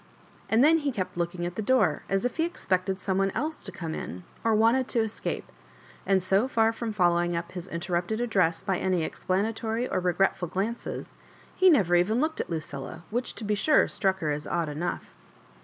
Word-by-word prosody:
And 225 Hz, +3 st, +4 dB
then 325 Hz, +2 st, +6 dB
he 290 Hz, -2 st, -1 dB
kept 190 Hz, -7 st, -4 dB
looking 175 Hz, 0 st, -2 dB
at 175 Hz, -, -3 dB
the 215 Hz, -, -3 dB
door, 210 Hz, -, +2 dB
as 195 Hz, +4 st, +1 dB
if 245 Hz, -, -2 dB
he 325 Hz, -, +2 dB
expected 190 Hz, -, -1 dB
some 190 Hz, 0 st, 0 dB
one 195 Hz, 0 st, +2 dB
else 310 Hz, +2 st, -3 dB
to -, -, -5 dB
come 165 Hz, -2 st, -5 dB
in, 90 Hz, -, -6 dB, 0.2 s
or 225 Hz, -1 st, +3 dB
wanted 230 Hz, +4 st, +3 dB
to 235 Hz, -, +1 dB
escape 220 Hz, -1 st, -3 dB
J -, -, -24 dB, 0.5 s
and 190 Hz, -1 st, +3 dB
so 195 Hz, +6 st, +2 dB
fer 225 Hz, -3 st, +3 dB
from 225 Hz, 0 st, -4 dB
following 175 Hz, -3 st, +2 dB
up 170 Hz, +1 st, -4 dB
his 180 Hz, 0 st, -6 dB
inter 175 Hz, +1 st, -5 dB
rupted 175 Hz, +6 st, 0 dB
address 185 Hz, -8 st, +1 dB
by 190 Hz, -2 st, 0 dB
any 185 Hz, -3 st, +1 dB
explanatory 220 Hz, +7 st, -1 dB
or 190 Hz, -, 0 dB
regretful 180 Hz, 0 st, +1 dB
glances, 210 Hz, +8 st, -4 dB, 0.4 s
he 375 Hz, -, +6 dB
never 200 Hz, -, +4 dB
even 195 Hz, +7 st, +3 dB
looked 315 Hz, +3 st, 0 dB
at -, -, -6 dB
Lucilla, 155 Hz, -2 st, -5 dB
which, 245 Hz, +3 st, -2 dB
to -, -, -7 dB
be 210 Hz, 0 st, 0 dB
sure, 300 Hz, +9 st, +4 dB
struck 190 Hz, -2 st, 0 dB
her 155 Hz, -2 st, 0 dB
as 150 Hz, +1 st, -3 dB
odd 170 Hz, -3 st, -1 dB
enough. 170 Hz, +4 st, -3 dB
195 Hz, 205 wpm, -27 LUFS, 175-225 Hz, 0.5 s, then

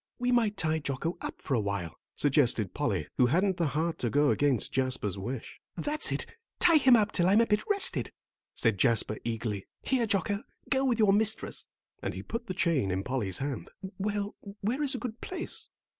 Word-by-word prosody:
"We 245 Hz, 0 st, 0 dB
might 225 Hz, -4 st, +2 dB
tie 160 Hz, -2 st, +1 dB
Jocko 155 Hz, +4 st, -3 dB
up -, -, -6 dB
for 140 Hz, -, -3 dB
a 120 Hz, -, +3 dB
while," 100 Hz, -5 st, -3 dB, 0.2 s
suggested 125 Hz, -, +2 dB
Polly, 100 Hz, -, -1 dB
who 125 Hz, -, +6 dB
hadn't 185 Hz, +7 st, +1 dB
the 170 Hz, -, +1 dB
heart 160 Hz, +4 st, -1 dB
to 120 Hz, -, 0 dB
go 145 Hz, +3 st, +3 dB
against 140 Hz, -6 st, +1 dB
Jasper's 130 Hz, -7 st, 0 dB
wish. 115 Hz, +5 st, -6 dB, 0.2 s
"That's 300 Hz, +1 st, +3 dB
it, -, -, -1 dB, 0.3 s
tie 335 Hz, -2 st, +6 dB
him 260 Hz, -3 st, +6 dB
up 215 Hz, -1 st, +2 dB
till 175 Hz, -1 st, +2 dB
I'm 200 Hz, +4 st, +5 dB
a -, -, +4 dB
bit 210 Hz, -1 st, +1 dB
rested," 400 Hz, -1 st, +4 dB, 0.4 s
said 115 Hz, -5 st, +2 dB
Jasper, 110 Hz, -1 st, +2 dB
eagerly. 110 Hz, -4 st, -3 dB, 0.2 s
"Here, 250 Hz, -4 st, +1 dB
Jocko, 200 Hz, 0 st, 0 dB, 0.3 s
go 270 Hz, 0 st, +2 dB
with 245 Hz, -4 st, +2 dB
your 210 Hz, -3 st, +4 dB
mistress," 220 Hz, +1 st, 0 dB, 0.3 s
and -, -, -3 dB
he -, -, -6 dB
put 230 Hz, +1 st, -5 dB
the 185 Hz, -, -4 dB
chain 165 Hz, -, +1 dB
in 95 Hz, +1 st, -1 dB
Polly's 110 Hz, -8 st, -2 dB
hand. 140 Hz, 0 st, -4 dB, 0.3 s
"Well, 205 Hz, +1 st, -2 dB, 0.3 s
where 235 Hz, +8 st, -1 dB
is 280 Hz, -2 st, +3 dB
a -, -, -2 dB
good 240 Hz, -2 st, -6 dB
place?" 365 Hz, -2 st, -5 dB
165 Hz, 195 wpm, -29 LUFS, -, 0.4 s, who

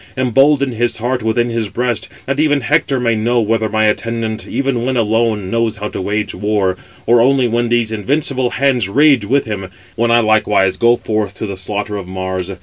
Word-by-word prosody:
embolden 135 Hz, +2 st, +3 dB
his 120 Hz, +1 st, -1 dB
heart 125 Hz, +2 st, -2 dB
within 115 Hz, +2 st, 0 dB
his 115 Hz, -3 st, -2 dB
breast, 120 Hz, 0 st, -2 dB, 0.2 s
that 135 Hz, +1 st, -2 dB
even 145 Hz, -2 st, +2 dB
Hector 140 Hz, 0 st, +1 dB
may 115 Hz, -2 st, +1 dB
know 120 Hz, +3 st, +1 dB
whether 110 Hz, 0 st, 0 dB
my 110 Hz, +1 st, +1 dB
attendant, 115 Hz, +1 st, -2 dB
even 130 Hz, -1 st, -1 dB
when 130 Hz, 0 st, -1 dB
alone, 110 Hz, -3 st, 0 dB
knows 115 Hz, -2 st, 0 dB
how 105 Hz, +1 st, -4 dB
to -, -, -5 dB
wage 105 Hz, +2 st, -2 dB
war, 100 Hz, -3 st, 0 dB, 0.3 s
or 120 Hz, 0 st, +4 dB
[only] 130 Hz, 0 st, +3 dB
when 120 Hz, 0 st, 0 dB
these 120 Hz, -2 st, +1 dB
invincible 130 Hz, +3 st, 0 dB
hands 125 Hz, -7 st, +1 dB
rage 140 Hz, -1 st, +4 dB
with 140 Hz, +6 st, +1 dB
him, 100 Hz, -4 st, -5 dB, 0.3 s
when 115 Hz, +1 st, 0 dB
I 120 Hz, 0 st, +5 dB
likewise 110 Hz, -3 st, +2 dB
go 120 Hz, 0 st, +3 dB
forth 110 Hz, -3 st, -3 dB
to -, -, -5 dB
the 100 Hz, -2 st, -5 dB
slaughter 105 Hz, +2 st, -4 dB
of 95 Hz, -3 st, -7 dB
Mars. 95 Hz, 0 st, -4 dB
115 Hz, 195 wpm, -16 LUFS, 105-125 Hz, 0.3 s, I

